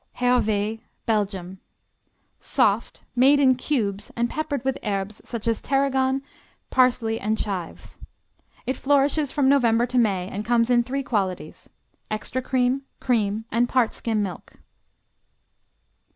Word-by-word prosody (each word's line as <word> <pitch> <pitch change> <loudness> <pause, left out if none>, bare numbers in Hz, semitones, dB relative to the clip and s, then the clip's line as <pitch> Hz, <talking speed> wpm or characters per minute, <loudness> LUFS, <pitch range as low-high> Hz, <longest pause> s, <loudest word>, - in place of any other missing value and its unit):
Hervé 225 -3 +1 0.2
Belgium 195 -4 -1 0.8
Soft; 230 -5 0
made 270 +4 +5
in 265 -2 +5
cubes 215 -7 -2
and 235 0 0
peppered 290 -4 -3
with 265 - 0
herbes 200 0 -3
such 235 -2 -5
as 230 -1 +1
tarragon, 270 -1 +1 0.5
parsley 240 -3 +2
and 215 +1 -1
chives. 190 -6 -5 0.7
It 260 - -2
flourishes 285 +1 +2
from 280 -2 +1
November 240 -4 +4
to 250 0 0
May 195 -6 +1
and 205 +2 -5
comes 235 +1 +2
in 240 -1 +5
three 275 +3 -3
qualities: 200 -8 -3 0.4
extra 215 +4 -3
cream, 255 +1 +1 0.2
cream, 220 -3 0
and 240 +2 +2
part 250 -4 +2
skim 220 -3 -1
milk. 185 -3 -7
235 Hz, 125 wpm, -24 LUFS, 210-260 Hz, 0.8 s, made